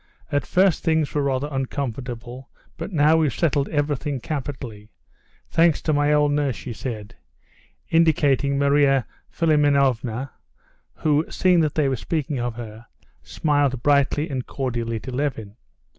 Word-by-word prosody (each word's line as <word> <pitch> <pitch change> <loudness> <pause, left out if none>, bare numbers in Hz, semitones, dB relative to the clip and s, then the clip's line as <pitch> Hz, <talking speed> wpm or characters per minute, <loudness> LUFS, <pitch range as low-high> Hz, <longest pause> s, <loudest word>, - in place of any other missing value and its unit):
"At 145 -1 0
first 185 -2 +2
things 160 -3 +1
were 150 - +1
rather 140 0 0
uncomfortable, 125 -2 -5 0.3
but - - -6
now 155 -1 +4
we've 155 -4 +2
settled 145 -4 0
everything 145 -1 -1
capitally—thanks 130 - -3
to 155 - +1
my 145 0 +2
old 150 -1 +3
nurse," 145 -4 0
she 125 - -7
said, 110 -3 -6 0.7
indicating 145 -4 +2
Marya 140 -2 +3 0.2
Philimonovna, 140 -5 +1 0.6
who, 150 0 +2
seeing 180 -2 +3
that 155 -3 +1
they 150 -3 +2
were 135 - 0
speaking 150 +1 -3
of 120 -1 -3
her, 115 -1 -9 0.3
smiled 145 -5 0
brightly 145 +1 +2
and 130 -5 -4
cordially 120 -4 -3
to 130 - -7
Levin. 125 -6 -3
140 Hz, 130 wpm, -23 LUFS, 125-150 Hz, 0.7 s, now